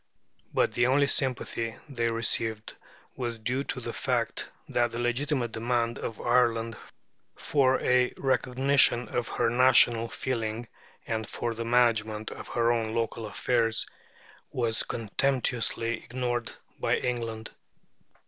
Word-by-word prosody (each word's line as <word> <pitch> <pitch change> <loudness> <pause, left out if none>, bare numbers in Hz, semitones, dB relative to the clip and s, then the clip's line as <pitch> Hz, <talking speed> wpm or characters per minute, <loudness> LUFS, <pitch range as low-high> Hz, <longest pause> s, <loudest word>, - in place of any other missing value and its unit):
But - - +2
the 120 0 +2
only 140 +2 +4
sympathy 120 -4 -1
they 120 -5 -1
received 115 -1 -1 0.4
was 120 -2 -3
due 125 +5 -1
to - - +1
the - - -5
fact - - -1 0.2
that 120 -1 +1
the 115 - -6
legitimate 120 +1 0
demand 115 +1 -1
of 115 - -5
Ireland 115 -2 +2 0.6
for 135 -3 +2
a 125 0 +3
recognition 130 -1 +2
of 120 -1 -2
her 120 - 0
national 120 -1 +5
feeling 115 -2 -3 0.4
and 110 -1 -3
for 115 - -3
the 115 +1 -5
management 110 -3 +2
of - - -8
her 120 0 +2
own 115 -1 -1
local 115 -1 -2
affairs 115 +1 0 0.7
was 115 -3 0
contemptuously 115 0 0
ignored 120 -1 -2 0.3
by - - +2
England. 115 -3 -3
120 Hz, 125 wpm, -28 LUFS, 115-125 Hz, 0.7 s, national